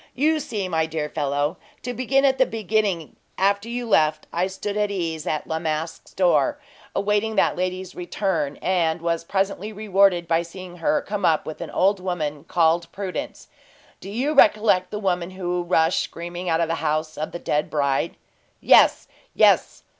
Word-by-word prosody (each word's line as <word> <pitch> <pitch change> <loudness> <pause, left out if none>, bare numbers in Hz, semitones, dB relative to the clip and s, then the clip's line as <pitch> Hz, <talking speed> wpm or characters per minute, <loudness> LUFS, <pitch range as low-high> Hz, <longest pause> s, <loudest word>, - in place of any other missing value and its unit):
"You 310 +4 +2
see, 210 -9 -3
my 160 -2 0
dear 155 -2 -3
fellow, 145 +4 -1 0.3
to 245 - -3
begin 270 +3 +2
at 265 -1 +2
the 260 - +4
beginning, 210 -6 -1 0.2
after 200 +3 +1
you 240 0 -4
left, 155 -7 +2
I 180 +2 +1
stood 200 +2 -5
at 210 -1 +1
ease 165 -5 -3
at 155 - -1
La 160 - -2
Masque's 160 0 -4
door, 195 - +2 0.4
awaiting 210 +2 0
that - - +3
lady's 185 0 -3
return, 175 -5 -2
and 175 -3 +1
was 170 0 -1
presently 195 +3 -2
rewarded 195 -4 +2
by 165 0 +2
seeing 175 +1 -10
her 165 -2 +1
come 205 -1 -4
up 160 -3 +2
with 155 - -7
an - - -5
old 195 +1 +2
woman 155 -5 -3
called 170 0 +1
Prudence. 200 +10 -5 0.5
Do 195 - -9
you 255 +9 -1
recollect 210 -7 +4
the 210 - -4
woman 180 -4 -1
who 180 -1 -3
rushed 170 -1 +2
screaming 175 +1 -5
out 165 0 +2
of 165 - +1
the 165 - -1
home 155 0 0
of 155 - -3
the - - -5
dead 150 -3 -1
bride?" 140 -3 0 0.4
"Yes, - - +5 0.3
yes!" - - +3
180 Hz, 175 wpm, -23 LUFS, 165-205 Hz, 0.5 s, Yes